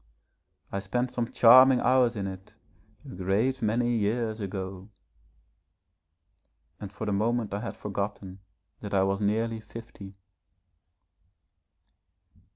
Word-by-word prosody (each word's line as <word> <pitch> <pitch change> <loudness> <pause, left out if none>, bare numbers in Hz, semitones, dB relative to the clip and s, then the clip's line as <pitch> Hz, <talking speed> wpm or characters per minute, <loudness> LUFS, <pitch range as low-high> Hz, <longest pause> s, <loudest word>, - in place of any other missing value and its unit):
I 100 - -2
spent 120 +6 -2
some 120 -2 -3
charming 130 +2 +7
hours 125 -2 +3
in 100 -2 -3
it 95 0 -9 0.5
a - - -10
great 100 +8 -1
many 120 +2 +1
years 110 +1 -1
ago 95 -1 -6 0.8
' 80 -2 -47
and 100 -2 -8
for 105 +2 -6
the 105 - -1
moment 110 +1 -1
I 100 - -2
had - - -6
forgotten 100 -2 -5 0.4
that 100 -1 -5
I 95 - +3
was 95 +1 -1
nearly 110 +2 0
fifty. 110 -3 -11
105 Hz, 120 wpm, -27 LUFS, 95-115 Hz, 0.8 s, charming